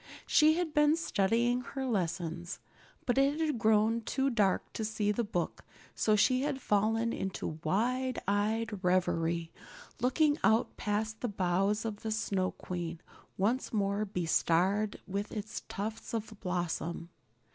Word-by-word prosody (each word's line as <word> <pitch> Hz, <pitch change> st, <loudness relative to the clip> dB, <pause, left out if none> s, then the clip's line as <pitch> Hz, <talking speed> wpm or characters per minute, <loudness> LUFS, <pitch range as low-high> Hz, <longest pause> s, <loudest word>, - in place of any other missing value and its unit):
She 310 Hz, 0 st, +5 dB
had 340 Hz, -3 st, -1 dB
been 300 Hz, +1 st, +5 dB
studying 240 Hz, -3 st, +1 dB
her 265 Hz, +1 st, -5 dB
lessons, 175 Hz, -5 st, -2 dB, 0.5 s
but 245 Hz, +2 st, +2 dB
it 280 Hz, +3 st, +2 dB
had 305 Hz, -7 st, 0 dB
grown 220 Hz, +1 st, +3 dB
too 270 Hz, +4 st, 0 dB
dark 205 Hz, -5 st, +1 dB
to 220 Hz, -, -3 dB
see 215 Hz, -1 st, 0 dB
the 235 Hz, +3 st, 0 dB
book, 180 Hz, -5 st, -3 dB, 0.3 s
so 215 Hz, -, +2 dB
she 255 Hz, +5 st, +3 dB
had 275 Hz, -1 st, -1 dB
fallen 225 Hz, +1 st, +1 dB
into 185 Hz, -4 st, -4 dB
wide 250 Hz, +9 st, 0 dB
eyed 210 Hz, 0 st, 0 dB
reverie, 170 Hz, -2 st, +1 dB, 0.5 s
looking 290 Hz, +5 st, +2 dB
out 220 Hz, +1 st, +3 dB
past 215 Hz, +1 st, -2 dB
the 245 Hz, -, 0 dB
boughs 195 Hz, +1 st, 0 dB
of 215 Hz, -2 st, -3 dB
the 220 Hz, -, -3 dB
Snow 195 Hz, -4 st, 0 dB
Queen, 170 Hz, -2 st, -5 dB, 0.4 s
once 230 Hz, +7 st, 0 dB
more 200 Hz, -1 st, 0 dB
bestarred 190 Hz, +2 st, +1 dB
with 200 Hz, +2 st, -3 dB
its 215 Hz, +1 st, -5 dB
tufts 220 Hz, +3 st, -4 dB
of 220 Hz, 0 st, -4 dB
blossom. 175 Hz, -2 st, -3 dB
215 Hz, 140 wpm, -31 LUFS, 185-235 Hz, 0.5 s, She